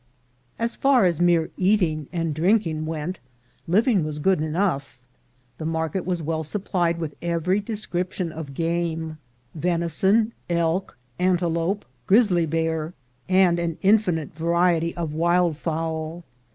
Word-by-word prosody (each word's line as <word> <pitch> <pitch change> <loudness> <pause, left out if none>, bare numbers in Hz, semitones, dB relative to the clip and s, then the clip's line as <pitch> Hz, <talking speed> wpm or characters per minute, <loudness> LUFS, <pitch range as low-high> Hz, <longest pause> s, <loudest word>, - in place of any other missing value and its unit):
As 230 +1 -1
far 270 -6 +4
as 175 -2 +1
mere 170 -2 +3
eating 180 -7 +1
and 165 -2 -1
drinking 165 -2 +1
went, 160 +3 -4 0.5
living 205 - +3
was 150 -1 -4
good 185 +2 +2
enough. 155 -4 -1 0.6
The 155 - -4
market 160 +2 -2
was 175 -3 -1
well 160 +1 -1
supplied 175 0 -1
with 160 -3 -4
every 170 +3 0
description 185 -5 -3
of 155 -3 -8
game 165 -1 -2 0.2
— 120 - -39
venison, 180 +7 +1 0.2
elk, 170 +1 0 0.2
ante 180 -1 +2
lope, 170 +4 -1 0.2
grizzly 190 -6 +4
bear, 160 +1 -1 0.3
and 185 -2 +4
an 170 -1 -2
infinite 190 -7 +2
variety 170 +1 +1
of 165 -3 -3
wild 170 +1 +2
fowl. 160 +1 -3
170 Hz, 130 wpm, -24 LUFS, 160-185 Hz, 0.6 s, far